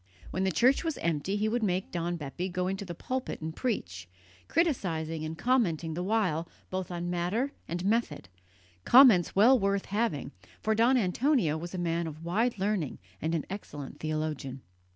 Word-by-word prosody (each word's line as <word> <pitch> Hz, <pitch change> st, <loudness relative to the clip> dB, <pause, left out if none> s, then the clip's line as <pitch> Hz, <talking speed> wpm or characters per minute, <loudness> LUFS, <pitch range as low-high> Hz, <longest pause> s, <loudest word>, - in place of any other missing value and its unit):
When 190 Hz, +1 st, 0 dB
the 190 Hz, -, +2 dB
church 255 Hz, -, +3 dB
was 325 Hz, -3 st, -2 dB
empty 170 Hz, +4 st, -1 dB
he 210 Hz, +1 st, +1 dB
would 235 Hz, +2 st, 0 dB
make 185 Hz, -3 st, -1 dB
Don 175 Hz, 0 st, -2 dB
Bepi 170 Hz, +4 st, -4 dB
go 180 Hz, 0 st, -1 dB
into 195 Hz, +1 st, -2 dB
the 175 Hz, -2 st, -6 dB
pulpit 260 Hz, +8 st, -4 dB
and 160 Hz, 0 st, -5 dB
preach, 90 Hz, -, -3 dB, 0.4 s
criticizing 165 Hz, -, 0 dB
and 160 Hz, +1 st, -5 dB
commenting 175 Hz, -10 st, +1 dB
the 175 Hz, -, -3 dB
while 180 Hz, -5 st, 0 dB, 0.2 s
both 185 Hz, -1 st, -3 dB
on 175 Hz, 0 st, -3 dB
matter 185 Hz, +10 st, 0 dB, 0.2 s
and 175 Hz, +2 st, -3 dB
method; 210 Hz, -, 0 dB, 0.6 s
comments 235 Hz, -9 st, +7 dB
well 240 Hz, +6 st, +6 dB
worth 200 Hz, -1 st, 0 dB
having, 205 Hz, -, -1 dB, 0.3 s
for 220 Hz, -, +1 dB
Don 235 Hz, +4 st, +4 dB
Antonio 220 Hz, -, +2 dB
was 170 Hz, +3 st, -6 dB
a -, -, -3 dB
man 170 Hz, -1 st, -1 dB
of 160 Hz, +1 st, -8 dB
wide 220 Hz, +7 st, +1 dB
learning 195 Hz, -6 st, -1 dB, 0.2 s
and 160 Hz, +2 st, 0 dB
an 155 Hz, -, -2 dB
excellent 150 Hz, -8 st, -7 dB
theologian. 155 Hz, -4 st, -3 dB
180 Hz, 170 wpm, -29 LUFS, 160-220 Hz, 0.6 s, comments